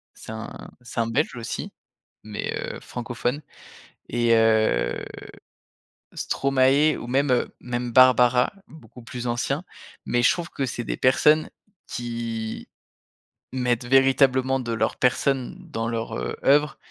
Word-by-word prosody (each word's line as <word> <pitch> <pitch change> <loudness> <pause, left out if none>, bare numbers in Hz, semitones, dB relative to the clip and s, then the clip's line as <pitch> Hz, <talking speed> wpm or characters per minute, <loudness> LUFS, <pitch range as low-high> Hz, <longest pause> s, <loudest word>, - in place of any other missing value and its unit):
c'est - - -10
un 110 0 -6 0.3
c'est 120 -1 -7
un 115 - +2
belge 135 +5 0
aussi, 115 -2 -5 0.5
mais, 105 -1 -4
heu, - - -5
francophone. 125 +3 -3 0.7
Et 120 -1 +2
heu, 110 - +2 1.1
Stromae 135 +3 +2
ou - - -7
même, 135 +2 +1
heu, 125 - +1
même 120 0 -3
Barbara, 125 0 +5 0.2
beaucoup 125 -5 -14
plus 120 +1 -6
ancien. 130 +6 -1 0.4
Mais 120 0 +1
je - - +6
trouve 175 -1 -4
que 135 - -3
c'est 120 -1 -4
des - - -3
personnes 150 +4 +4 0.4
qui 115 -2 -5 0.9
mettent 125 -2 0
véritablement 135 0 +3
de 120 -2 -4
leur 110 -1 -1
personne 130 +3 0
dans 115 -4 -2
leur, 115 -1 -3
heu, - - -4
œuvre, 145 +1 +4
125 Hz, 130 wpm, -24 LUFS, 115-135 Hz, 1.1 s, je